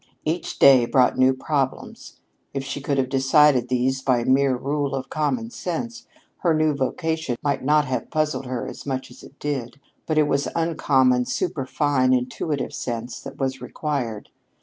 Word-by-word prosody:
Each 160 +3 -2
day 130 -3 +7
brought 125 -1 +3
new 130 0 +6
problems. 135 -1 -3 0.3
If 135 - -2
she 135 +1 -5
could 140 0 -1
have 130 -1 +1
decided 135 -1 +4
these 130 +1 0
by 125 -3 +2
mere 130 0 +3
rule 140 +1 -2
of 130 -1 -5
common 230 +10 -1
sense, 230 +6 -5 0.3
her 170 -3 +1
new 155 -1 +2
vocation 160 0 -2
might 140 -2 0
not 150 +2 +3
have 130 -1 -3
puzzled 155 -3 -1
her 125 -1 -3
as - - -8
much 130 -1 -3
as - - -14
it 140 - -15
did. 135 -3 -4 0.3
But 155 - 0
it 150 -1 +4
was 140 0 0
uncommon, 135 -7 +2
superfine, 140 -5 0
intuitive 130 +4 -2
sense 120 0 -5
that - - -9
was 135 -1 -2
required. 125 -9 -4
135 Hz, 165 wpm, -23 LUFS, 130-150 Hz, 0.3 s, day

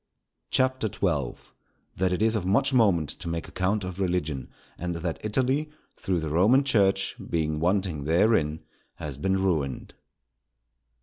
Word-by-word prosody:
CHAPTER 130 -2 +1
XII.—That 85 +3 -3
it 90 +4 0
is 110 0 +3
of 105 - -1
much 110 +9 +2
moment 95 - +3
to - - -7
make 85 0 -3
account 100 +3 -1
of 90 0 -6
Religion; 80 -9 -1 0.3
and 85 0 -4
that 85 0 -3
Italy, 130 +7 0 0.3
through 90 -3 -1
the 80 -1 -3
Roman 105 - +4
Church, 100 -7 +2
being 80 -2 0
wanting 90 -4 0
therein, 80 -2 +2 0.3
has 70 -2 -6
been 95 +4 +1
ruined. 75 -8 -1
90 Hz, 135 wpm, -26 LUFS, 80-105 Hz, 0.3 s, Roman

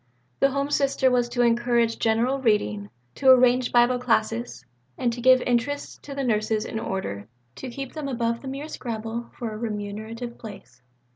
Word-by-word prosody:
The 275 - +4
Home 280 +1 -2
Sister 275 -2 +2
was 245 -1 +2
to 245 0 +1
encourage 235 -1 +2
general 235 +5 +1
reading, 105 - +1 0.2
to 270 - +2
arrange 250 -1 +5
Bible 245 +1 +4
classes, 230 - -1 0.3
to 240 -1 -1
give 255 +1 +6
interests 250 +4 -1
to 280 - -8
the 275 - -2
nurses 215 -2 0
in 220 - -4
order 100 - -4 0.3
"to 265 - -6
keep 270 +1 -7
them 305 -3 -5
above 235 -3 -1
the 275 - -9
mere 275 +3 -5
scramble 230 -3 -5
for 235 -3 -4
a - - -6
remunerative 220 +2 -5
place." 195 - -11
240 Hz, 165 wpm, -25 LUFS, 220-255 Hz, 0.3 s, give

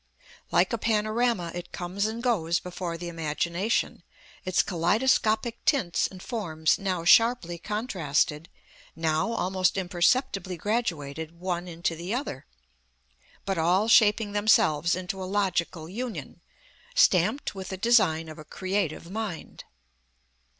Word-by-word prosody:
Like - - +2
a 230 - -1
panorama, 215 -4 0
it 175 0 -7
comes 185 +4 -2
and 225 +2 -5
goes 175 -9 +1
before 175 -1 -5
the 175 +1 -6
imagination, 170 +5 -1 0.4
its 185 -1 +2
kaleidoscopic 220 +5 +1
tints 265 - +1
and 185 -1 -12
forms 160 -10 0
now 185 -4 -2
sharply 210 -4 +4
contrasted, 170 - -1 0.5
now 160 +5 0
almost 190 -4 0
imperceptibly 185 +1 +1
graduated 165 -6 -3
one 180 -1 -3
into 170 -1 -2
the 175 +7 -4
other, 245 - -5 1.0
but 195 -3 -1
all 180 +6 +2
shaping 215 -1 +4
themselves 175 -7 +3
into 185 +1 -5
a - - -3
logical 180 -5 -1
union, 235 +6 -6 0.5
stamped 290 - +3
with 190 -2 -7
the 190 - -5
design 190 -7 +3
of 155 0 -10
a - - -8
creative 185 -1 -3
mind. 210 -6 -6
185 Hz, 120 wpm, -27 LUFS, 170-215 Hz, 1.0 s, sharply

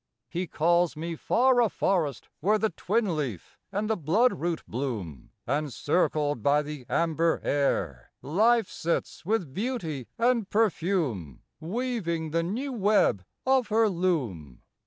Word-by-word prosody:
He 180 +1 -3
calls 170 +1 +2
me 165 +2 -4
far 245 +8 +3
a 230 - +3
forest; 170 -10 0
where 210 +6 +3
The 220 0 0
twin 210 -7 0
leaf 130 - -5
and 205 +2 -1
the 220 - +1
blood 210 - +3
root 170 +1 -2
bloom; 110 - -4 0.2
And, 145 +3 -1
circled 145 -3 0
by 145 +5 +3
the 145 -4 -8
amber 165 0 +1
air, 90 - 0
Life 220 - +3
sits 170 +1 -3
with 195 -10 0
beauty 185 - -3
and 235 -3 +2
perfume 165 - 0 0.2
Weaving 170 -4 -2
the 165 +1 +1
new 240 +11 -3
web 205 - +2 0.2
of 260 -3 +3
her 220 +1 +3
loom. 130 - -2
170 Hz, 135 wpm, -27 LUFS, 145-215 Hz, 0.2 s, far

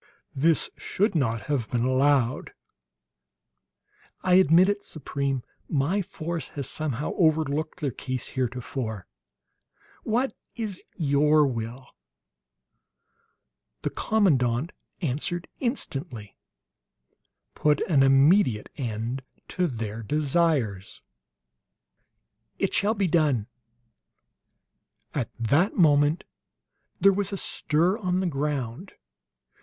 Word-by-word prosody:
"This 155 +4 +2
should 205 +2 0
not 115 -8 0
have 125 0 -2
been 120 -1 0
allowed!" 130 -1 +2 1.7
"I 185 - +2
admit 180 0 +6
it, 205 0 -1
Supreme; 140 -3 -3 0.3
my 155 +8 +1
force 170 -4 -5
has 140 - -1
somehow 150 -2 -2
overlooked 155 -1 +1
their 140 -3 0
case, 130 +1 -4
heretofore. 125 - -3 1.0
What 245 +5 0 0.2
is 215 -5 -4
your 150 0 +3
will?" 120 0 -4 2.0
The - - -1
commandant 145 - +1 0.3
answered 170 +4 -2
instantly: 135 - -4 1.2
"Put 150 -1 +2
an 150 -6 +3
immediate 135 - +4
end 120 +1 -3 0.3
to 180 -1 0
their 115 -4 -5
desires!" 140 - 0 1.5
"It - - -1
shall 210 +3 +2
be 200 -2 +1
done!" 155 - +2 1.7
At 130 -6 -2
that 145 - +2
moment 150 -1 +4 0.8
there 195 +2 +6
was 200 0 -1
a 200 - -3
stir 175 +4 0
on 180 -2 0
the 190 - 0
ground. 145 - -3
145 Hz, 95 wpm, -26 LUFS, 125-175 Hz, 2.0 s, admit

